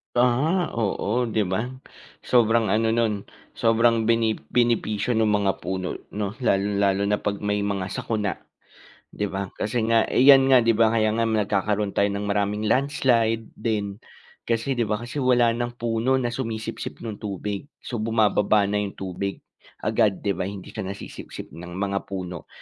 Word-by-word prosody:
Aha, 135 +9 +2
oo, 115 +2 -1
'di 110 -1 +1
ba? 95 +5 -1 0.6
Sobrang 115 -3 +3
ano, 110 +1 +2
no'n, 110 -4 0 0.2
sobrang 115 0 +2
bene 115 -1 +2
benepisyo 120 -2 +1
ng 110 -2 +2
mga 105 -2 +2
puno, 95 -1 -4 0.2
'no, 100 -1 -2
lalong-lalo 100 -3 +1
na 105 +1 +1
'pag 100 0 -3
may 105 0 0
mga 100 -2 -2
sakuna, 105 -3 -2 0.7
'di 105 - -2
ba? 95 -1 -4
Kasi 110 +2 -2
nga, 115 -1 +4
eh, - - +2
yan 135 -1 +8
nga 130 -3 +6
'di 115 - +4
ba, 115 0 +3
kaya 110 -1 +3
nga 115 +1 +1
nagkakaroon 105 -1 0
tayo 100 - +2
ng 100 - -3
maraming 105 +1 0
landslide 115 -5 +1
din, 105 -3 -2 0.5
kasi 115 +3 0
'di 115 - +1
ba, 105 - +1
kasi 125 +5 -5
wala 125 -3 +4
ng 120 +1 -3
puno 115 +2 0
na 125 -2 0
sumisipsip 115 -2 -5
no'ng 110 -3 -6
tubig. 100 +3 -4 0.2
So, 120 - -4
bumababa 110 -2 +3
na 105 +1 0
yung 100 -1 -5
tubig 95 +1 -4 0.4
agad, 100 -3 +1
'di 100 - +1
ba, 90 +1 -3
hindi 100 -2 -9
ka 110 - -4
nasisipsip 100 +1 -8
ng 85 +2 -9
mga 100 0 -2
puno. 90 -3 -6
110 Hz, 165 wpm, -24 LUFS, 100-115 Hz, 0.7 s, yan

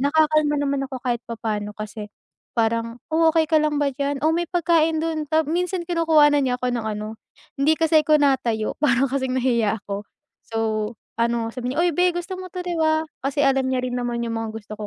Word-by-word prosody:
nakakalma 305 +1 +3
naman 280 -1 0
ako 265 -1 -6
kahit 240 -1 -1
pa 230 -1 -6
pa'no 210 -2 -2
kasi 215 0 -7 0.5
parang, 230 +1 0
oh, 320 0 +4
okey 320 -1 +3
ka 315 - +5
lang 300 -1 0
ba 285 - +2
diyan 280 +1 -2
o 315 - +4
may 345 - 0
pagkain 325 -2 +2
don 320 -1 -2
tapos 315 0 +1
minsan 360 +1 -1
kinukuhan 320 -4 +4
niya 260 -3 +1
ako 250 - 0
ng 235 -2 -2
ano 215 +1 -4 0.4
hindi 285 +3 +4
kasi 320 -1 +3
ako 305 - +4
natayo 240 -6 +1
para 270 -2 +2
kasing 260 -2 -1
nahiya 235 -5 +1
ako. 200 0 -5 0.4
So, 225 - -4 0.6
ano 235 -1 0
sabi 250 +1 -3
niya, - - +1
"uy, 350 - +3
beh! 360 0 +3
gusto 350 +2 -4
mo 370 - -6
'to, 365 - -4
'di 355 -1 -3
ba?" 315 0 +2 0.2
Kasi 280 +1 -1
alam 270 -1 +3
niya 255 - +1
rin 250 -1 -2
naman 240 -1 -2
yung 230 -1 -3
mga 225 -1 -4
gusto 215 -1 -8
ko 210 - -5
275 Hz, 215 wpm, -23 LUFS, 235-315 Hz, 0.6 s, ka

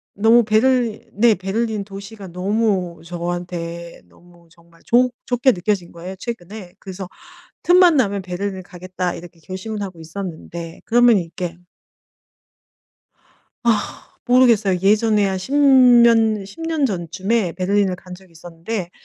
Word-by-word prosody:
너무 225 +3 +5
베를리 230 +1 +1
네 225 +2 +4
베를린 210 +3 -2
도시가 195 0 -10
너무 185 -1 -1
저한테 170 0 -6
너무 175 - -22
정말 170 0 -24
좋 250 +2 +3
좋게 250 +1 +2
느껴진 185 -2 -2
거예요 180 +3 -9
최근에. 190 -3 -8
그래서 190 -1 -8 0.6
'틈만 355 -1 +6
나면 200 -6 +1
베를린 190 +1 -5
가겠다.' 180 0 -5
이렇게 175 0 -12
결심을 195 +5 -6
하고 185 -4 -6
있었는데. 165 -1 -8
그러면 240 -1 +5
이렇게 170 -1 -5 2.1
아 225 -3 -2
모르겠어요. 230 -7 +4
예전에 210 +1 +3
한 190 -1 -2
10 190 +9 -7
년, 235 -6 +5
10 200 +11 -13
년 320 -3 -1
전쯤에 190 0 -1
베를린을 190 +1 0
간 180 0 -11
적이 185 -1 -17
있었는데 170 +3 -6
195 Hz, 285 characters per minute, -20 LUFS, 175-225 Hz, 2.1 s, 틈만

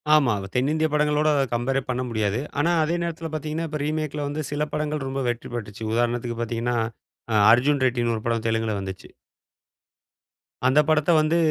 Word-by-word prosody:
ஆமா. 140 -7 +4
வ - - -6
தென்னிந்திய 155 +5 +2
படங்களோட 150 0 +2 0.2
கம்பேரே 135 +3 0
பண்ண 125 0 -1
முடியாது. 110 -1 0 0.2
ஆனா, 165 +4 +3
அதே 165 +2 0
நேரத்தில 165 -1 -4
பார்த்தீங்கன்னா, 155 +2 -3
இப்ப 150 0 -4
ரீமேக்‌ல 150 -1 -2
வந்து 150 +2 -3
சில 150 +1 0
படங்கள் 150 -2 -2
ரொம்ப 135 0 -2
வெற்றி 120 -1 -4
பெற்றுச்சு. 105 -1 -6
உதாரணத்துக்கு 120 0 0
பார்த்தீங்கன்னா, 120 +1 -1 0.6
அ - - +2 0.2
அர்ஜுன் 135 +4 +3
ரெட்டின்னு 120 -2 +1
ஒரு 110 - -5
படம் 115 -1 -1
தெலுங்குல 110 -1 0
வந்துச்சு. 95 -1 -7 1.6
அந்த 130 +3 +4
படத்த 155 -1 +2
வந்து 155 +2 +2
135 Hz, 160 wpm, -24 LUFS, 115-150 Hz, 1.6 s, ஆமா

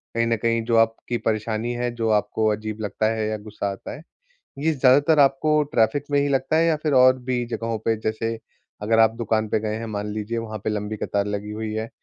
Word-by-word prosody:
कहीं 115 - +2
न 115 - +2
कहीं 115 +1 0
जो 115 - +1
आपकी 115 +1 +1
परेशानी 110 +1 -2
है, 120 0 -2
जो 115 -1 -1
आपको 105 +1 +1
अजीब 110 0 -4
लगता 105 +1 -2
है 110 -1 -2
या 110 0 -2
गुस्सा 105 -1 -5
आता 95 - -8
है, 150 - -11 0.6
ये 160 +3 +1
ज़्यादातर 145 +3 +4
आपको 150 +2 +3
ट्रैफ़िक 115 +5 +2
में 145 - +3
ही 145 - +1
लगता 135 +3 +1
है 165 - +4
या 165 -2 +2
फिर 150 - 0
और 130 0 +6
भी 125 -1 -2
जगहों 115 -1 -3
पे? 110 +1 0
जैसे 110 +1 -3 0.4
अगर 110 +2 +2
आप 110 0 +5
दुकान 110 -1 0
पे 105 - 0
गए 110 0 -2
हैं, 115 +1 -5
मान 105 -1 -4
लीजिए 110 +2 -3
वहाँ 110 -1 -5
पे - - 0
लंबी 105 0 -3
कतार 100 0 -1
लगी 105 0 -4
हुई 110 0 -4
है, 110 +1 -3
115 Hz, 230 wpm, -23 LUFS, 110-125 Hz, 0.6 s, और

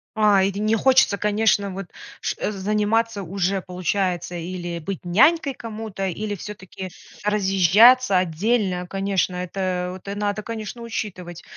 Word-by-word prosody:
А, 210 -3 +4
или 195 +1 -1
не 215 +1 +2
хочется, 255 -3 +4
конечно, 210 -1 +1
вот 195 +1 -6 0.3
ш - - -2
заниматься 210 +2 0
уже 190 +1 -1
получается 180 0 -2
или 175 0 -5
быть 180 +2 -6
нянькой 280 - +4
кому-то, 220 -5 -6
или 205 +3 -3
все-таки 190 -2 -8 0.3
разъезжаться 205 +3 +5
отдельно. 185 +1 0
Конечно, 195 -1 -1
это 180 0 -2
вот 200 - -6
надо, 205 0 -2
конечно, 230 +1 -6
учитывать. 185 -7 -6
200 Hz, 125 wpm, -23 LUFS, 185-215 Hz, 0.3 s, разъезжаться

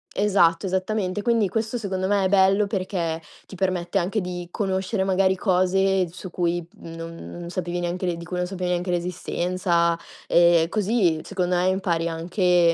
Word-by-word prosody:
Esatto, 190 -4 +3
esattamente. 190 +1 -1
Quindi 230 -2 +2
questo 225 +2 -2
secondo 190 -4 -2
me 200 -1 +2
è - - +2
bello 195 +1 +4
perché, 185 -5 -2 0.2
ti - - -11
permette 185 0 0
anche 195 +4 -1
di 180 -1 -5
conoscere 190 +1 -1
magari 190 0 +2
cose 190 0 +2
su 185 +1 -8
cui 175 -1 -1
non 165 0 -8 0.2
non 170 0 -7
sapevi 175 0 -3
neanche 175 +2 -2
l'e 175 -2 0
di 170 - -8
cui 180 +1 -4
non 180 - -1
sapevi 180 -1 -3
neanche 180 +1 -1
l'esistenza. 175 -1 0 0.3
Ehm, 170 -1 +5
così 205 -5 +1
secondo 180 -2 -1
e 180 +1 +2
impari 175 -3 0
anche 175 +1 +2
185 Hz, 165 wpm, -24 LUFS, 175-195 Hz, 0.3 s, Ehm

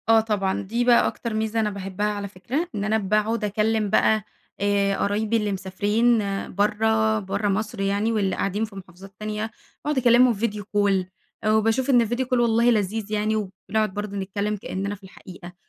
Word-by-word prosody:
آه 225 0 +7
طبعًا. 205 -3 -1
دي 230 +5 -1
بقى 240 -1 +5
أكتر 235 -2 -4
ميزة 220 +1 -1
أنا 215 -1 +1
باحبها 195 0 -4
على 205 -1 -2
فكرة، 250 - -3
إن 200 - -2
أنا 215 +1 +1
باقعد 215 +2 0
أكلّم 215 +1 0
بقى 215 +1 +3 0.4
آآ 200 -1 +1
قرايبي 215 +2 0
اللي 210 -2 -1
مسافرين 205 +5 +1 0.4
برّه 220 +1 +2
برّه 200 +1 -2
مصر 205 +1 -2
يعني، 200 +3 +1
واللي 200 -4 0
قاعدين 205 +3 -1
في 210 -2 -14
محافظات 190 +1 -12
تانية، 215 +1 -3 0.3
وأقعد 300 -1 0
أكلمهم 245 0 +5
video 210 -2 -1
call 200 -2 +1 0.4
آآ 215 - +2
وباشوف 225 +5 +2
إن 245 -3 +6
ال 230 - 0
video 240 +2 -1
call 255 0 +1
والله 235 0 +3
لذيذ 215 0 -1
يعني 215 +1 0
وبنقعد 215 +1 -2
برضه 205 0 -4
نتكلم 200 +2 -2
كأننا 200 +1 -4
في 200 - -20
الحقيقة، 180 -1 -12
210 Hz, 180 wpm, -24 LUFS, 200-225 Hz, 0.4 s, آه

